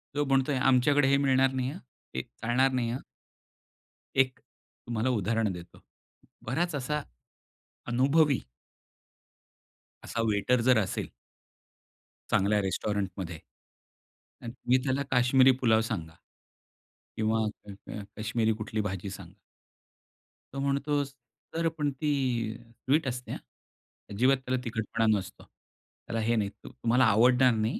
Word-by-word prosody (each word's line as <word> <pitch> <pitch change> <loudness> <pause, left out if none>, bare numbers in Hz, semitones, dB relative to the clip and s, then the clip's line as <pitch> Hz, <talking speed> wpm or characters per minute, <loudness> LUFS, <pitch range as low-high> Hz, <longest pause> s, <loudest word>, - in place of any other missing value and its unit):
तो 145 0 +1
म्हणतोय, 135 +1 +2
"आमच्याकडे 135 +2 +4
हे 140 +1 +4
मिळणार 135 -1 +3
नाही 130 -1 -1
हां. 175 - -8
अ, 130 - -16
हे - - +1
चालणार 130 +3 0
नाही 125 -3 0
हां. 125 - -3 1.2
एक 130 -1 +2
तुम्हाला 120 +1 -5
उदाहरण 110 -1 +1
देतो. 85 -1 -11 0.6
बराच 160 +7 -1
असा 150 +2 -2 0.9
अनुभवी 140 +4 +3 1.6
असा 115 - -3
वेटर 110 +4 +2
जर 125 - +6
असेल. 100 -4 -1 1.2
चांगल्या 105 +1 +3
रेस्टॉरंटमध्ये 95 -3 -3 1.0
अन 115 - -5
तुम्ही 125 +1 +1
त्याला 135 +1 0
काश्मिरी 130 +1 +5
पुलाव 110 -3 +4
सांगा. 80 -7 -4 1.0
किंवा 110 0 +1 0.2
क 100 - -8 0.2
क 105 - -5
काश्मिरी 110 +1 0
कुठली 110 0 -3
भाजी 95 -1 -3
सांगा. 95 -1 -11 1.2
तो 135 - -4
म्हणतो, 140 +1 0
"सर 140 +4 -6
पण 145 -2 0
ती 145 +3 -2 0.5
अ, 115 -1 -20
स्वीट 135 +6 0
असते 125 0 -4
हा, - - -3 0.7
अजिबात 125 +6 +3
त्याला 130 0 -1
तिखटपणा 115 -1 -1
नसतो. 95 -2 -8
त्याला 115 - -10
हे 115 +2 +1
नाही 105 -2 0
तु - - -14
तुम्हाला 125 0 +2
आवडणार 125 +4 +5
नाही. 110 +1 -1
125 Hz, 125 wpm, -29 LUFS, 110-135 Hz, 1.6 s, जर